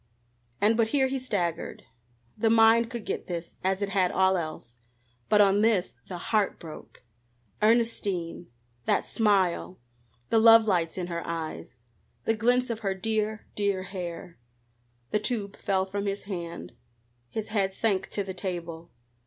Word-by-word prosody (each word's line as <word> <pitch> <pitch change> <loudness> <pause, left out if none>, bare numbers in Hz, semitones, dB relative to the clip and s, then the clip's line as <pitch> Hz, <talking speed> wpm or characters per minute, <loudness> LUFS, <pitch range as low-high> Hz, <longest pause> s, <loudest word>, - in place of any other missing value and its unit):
And 215 +2 +4
but 230 -1 +3
here 265 +3 +2
he 265 0 -1
staggered. 180 -10 -2 0.5
The 225 +1 +2
mind 225 +1 +5
could 235 -3 -6
get - - -3
this, 170 -1 -5
as 190 +2 +1
it 200 - -1
had 190 -3 +2
all 190 0 +3
else, 155 -8 -5 0.5
but 210 -1 +6
on 200 0 +4
this 215 -5 +2 0.2
the 180 - -4
heart 210 +3 0
broke. 160 -6 -11 0.6
Ernestine! 210 -7 +1 0.4
that - - +2
smile 190 -4 +1 0.5
the 225 - +5
love 225 0 +8
lights 175 -5 0
in 180 - -2
her 170 -1 -4
eyes 160 -6 -5 0.5
the 225 - +3
glints 245 +3 +2
of 225 - -4
her 195 -3 -1
dear, 215 +1 -2
dear 200 -2 0
hair 175 - -7 0.7
The 210 - +2
tube 210 -3 -3
fell 190 -1 0
from 200 +1 -3
his 200 0 -2
hand. 175 - -6 0.6
His 220 -1 -4
head 200 -3 +1
sank 195 -4 0
to 200 - -2
the 190 -1 -6
table. 170 -3 -5
200 Hz, 155 wpm, -27 LUFS, 180-220 Hz, 0.7 s, love